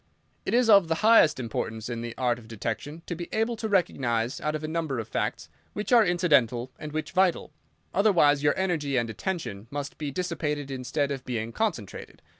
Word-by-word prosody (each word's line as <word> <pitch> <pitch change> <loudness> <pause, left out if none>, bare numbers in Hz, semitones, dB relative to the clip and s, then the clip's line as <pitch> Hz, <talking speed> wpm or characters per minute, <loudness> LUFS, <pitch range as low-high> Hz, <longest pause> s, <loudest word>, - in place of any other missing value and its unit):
"It - - +1
is 245 -1 +4
of 200 -5 +7
the 160 - +1
highest 220 -11 +6
importance 110 -1 -4
in 120 -1 -4
the 120 0 -6
art 120 -2 +1
of 110 - -15
detection 115 +9 -5
to - - -4
be 170 0 -6
able 225 +2 0
to 220 0 -3
recognise, 125 - 0
out 150 0 -1
of 155 - -5
a - - -2
number 160 -4 -2
of 115 - -4
facts, - - -2 0.3
which 210 +3 -4
are 235 -2 +8
incidental 135 - +2
and 155 - -6
which 155 +2 -4
vital. 185 -4 +1 0.4
Otherwise 170 -8 +4
your 145 0 +2
energy 160 -8 0
and 120 -2 0
attention 110 - -4
must 140 0 -5
be 150 -2 -3
dissipated 150 -3 -3
instead 135 +2 -2
of 135 -2 -4
being 115 -2 -3
concentrated. 160 - -4
150 Hz, 195 wpm, -27 LUFS, 120-175 Hz, 0.4 s, are